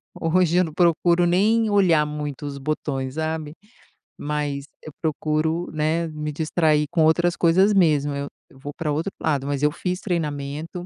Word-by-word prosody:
hoje 175 +1 +1
eu 180 - +5
não 160 -3 -5
procuro 175 0 +3
nem 215 +6 +2
olhar 180 -7 +3
muito 150 -1 -5
os 140 -1 -5
botões, 135 -2 -3
sabe, 160 -1 -3 0.6
mas 145 -1 -3 0.2
eu 155 - -10
procuro, 160 +1 -1
né, 160 +2 0
me 150 -1 -5
distrair 155 0 +1
com 170 -2 +2
outras 170 +2 +3
coisas 185 +5 +3
mesmo, 150 -7 +3
eu 140 0 -4 0.2
eu - - -19
vou 145 +2 -8
pra 150 -1 -2
outro 160 +7 -2
lado, 140 -4 0
mas 140 -1 -2
eu 150 - +4
fiz 180 0 -3
treinamento, 155 -1 -4
155 Hz, 165 wpm, -23 LUFS, 150-175 Hz, 0.6 s, eu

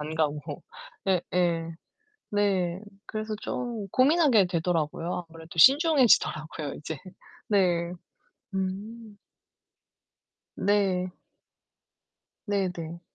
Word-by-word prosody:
안 155 +1 -5
가고. 150 -1 -2 0.4
예예. 175 -2 0 0.6
네. 190 -4 +1 0.3
그래서 215 0 -4
좀 235 -5 -4
고민하게 265 - +4
되더라고요. 170 0 -1
아무래도 165 +1 -12
신중해지더라고요 245 - +4
이제. 150 -1 -6 0.5
네. 175 -4 +2 0.6
음. 205 +3 -5 1.4
네. 190 -3 +1 1.4
네네. 180 -5 -2
185 Hz, 175 characters per minute, -27 LUFS, 165-210 Hz, 1.4 s, 고민하게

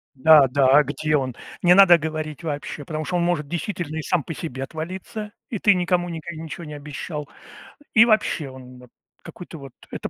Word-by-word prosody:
Да, 145 +1 +7
да. 135 +1 +2
А - - +6
где 150 +2 -1
он? 130 -3 -2 0.3
Не 180 0 +6
надо 190 -2 +8
говорить 155 -1 -5
вообще, 145 -1 -5
потому 155 +1 -4
что 180 - -2
он 175 - +1
может 170 -4 0
действительно 170 -1 -4
и - - -3
сам 175 +1 0
по 165 - -6
себе 135 -5 -5
отвалиться. 185 +7 -7 0.2
И 220 - -3
ты 205 +1 +4
никому 175 -1 0
ника 170 0 -6
ничего 160 +2 -7
не 150 -1 -8
обещал. 150 +1 -7 0.7
И 225 +1 +7
вообще 215 - +1
он, 130 -1 -12
вот, 125 -1 -16 0.3
какой-то, 175 -2 -10
вот. 135 -1 -11 0.2
Это - - -5
155 Hz, 195 wpm, -23 LUFS, 145-175 Hz, 0.7 s, надо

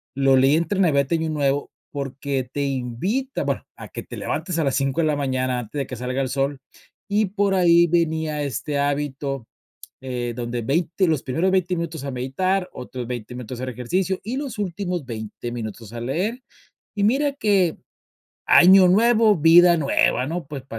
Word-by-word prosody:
lo 135 -1 +4
leí 135 +3 +4
entre 180 +4 0
Navidad 140 -7 +3
y - - +4
Año 160 0 -2
Nuevo, 145 -2 0 0.2
porque 135 -2 -3
te 145 - -2
invita, 140 - -2
bueno, - - -2
a - - -10
que - - -6
te - - -10
levantes 180 -3 -3
a 165 - +1
las 135 -2 0
5 135 +3 0
de 155 - +2
la 150 - +1
mañana 130 -3 -1
antes 120 +5 -7
de 140 - -1
que 125 - -7
salga 125 +3 -3
el 130 - -3
sol, 135 0 -1 0.5
y 205 0 +1
por 200 0 0
ahí 170 -2 +5
venía 160 -3 0
este 140 +1 -2
hábito, 140 -3 -2 0.6
eh, 125 -2 -3
donde 120 0 -4
20, 170 - 0
los 155 -4 0
primeros 165 +9 0
20 185 -1 +1
minutos 165 -4 -4
a 140 - -3
meditar, 180 +10 -1
otros 125 -1 -7
20 125 0 -6
minutos 125 0 -7
a - - -5
hacer 130 -1 -4
ejercicio, 185 +11 -1
y 240 +6 -4
los 270 -6 -5
últimos 180 -4 -3
20 115 0 -6
minutos 110 -2 -7
a 120 - -6
leer. 185 - -2 0.5
Y 200 - 0
mira 275 +6 +2
que 200 - +2 0.7
año 185 +1 +7
nuevo, 220 +1 +4
vida 170 +2 +6
nueva, 140 -3 +2
¿no? 165 -1 -4
Pues, 140 -3 -7
145 Hz, 185 wpm, -22 LUFS, 130-180 Hz, 0.7 s, año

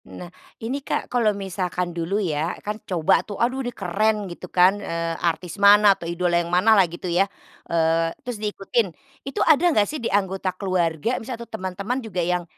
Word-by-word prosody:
Nah, 180 0 -10 0.3
ini 270 +5 -3
Kak, 275 - -3
kalau 235 -3 +3
misalkan 180 -2 -3
dulu 170 +4 -2
ya, 165 -4 -1
kan 210 +1 -4
coba 170 -4 +2
tuh, 205 -3 -8
aduh 255 +3 0
ini 245 - -3
keren 220 -2 0 0.2
gitu 180 +1 -9
kan, 180 +1 +5
eee, 165 -3 -3 0.2
artis 170 +1 -5
mana 205 0 +7
atau 170 -3 -7
idola 175 0 +1
yang 170 - -6
mana 185 +6 +4
lah 195 -3 +6
gitu 175 +2 -9
ya, 180 +3 +2 0.4
eee, 165 0 +2 0.2
terus 245 -2 -4
diikutin. 210 +2 0 0.4
Itu 275 - -2
ada 315 -2 +5
enggak 215 -11 +3
sih 300 +4 -5
di 230 - -1
anggota 195 -1 0
keluarga, 185 +3 -1
misal 240 +1 -6
atau 235 - -8
teman-teman 200 +5 -4
juga 220 -6 -9
yang 180 0 0
190 Hz, 190 wpm, -23 LUFS, 175-220 Hz, 0.4 s, mana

